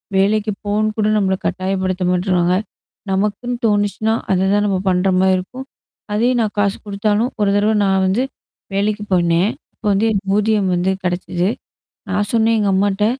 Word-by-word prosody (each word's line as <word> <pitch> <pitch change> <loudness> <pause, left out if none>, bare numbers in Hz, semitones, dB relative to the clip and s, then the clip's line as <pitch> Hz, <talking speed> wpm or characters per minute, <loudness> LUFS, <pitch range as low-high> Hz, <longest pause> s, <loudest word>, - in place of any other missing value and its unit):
வேலைக்கு 210 +2 +2
போனுகூட 215 +1 0
நம்மள 190 -2 +1
கட்டாயப்படுத்த 185 -1 -1
மாட்றாங்க. 180 -1 +1 0.6
நமக்குன்னு 210 +5 -1
தோணுச்சுன்னா, 205 +2 +1 0.2
அததான் 195 +3 +2
நம்ம 190 -2 0
பண்றமாரி 185 +1 +2
இருக்கும். 255 +9 -7 0.5
அதே 235 +4 +2
நான் 215 -2 -2
காசு 200 -1 +1
குடுத்தாலும் 210 +4 0
ஒரு 200 - +3
தடவ 215 +2 +2
நான் 190 0 +2
வந்து, 220 +7 +1 0.5
வேலைக்கு 210 +1 -1
போனேன். 175 +3 +2 0.2
அப்போ - - -16
வந்து 215 +3 +2
எனக்கு 195 -2 -1
ஊதியம் 210 -3 +1
வந்து 180 +2 +1
கிடைச்சிச்சு. 180 +1 -1 0.6
நான் 205 +1 0
சொன்னேன் 225 0 +3
எங்க 205 - +1
அம்மாட்ட. 200 +1 +1
200 Hz, 140 wpm, -18 LUFS, 190-210 Hz, 0.6 s, ஒரு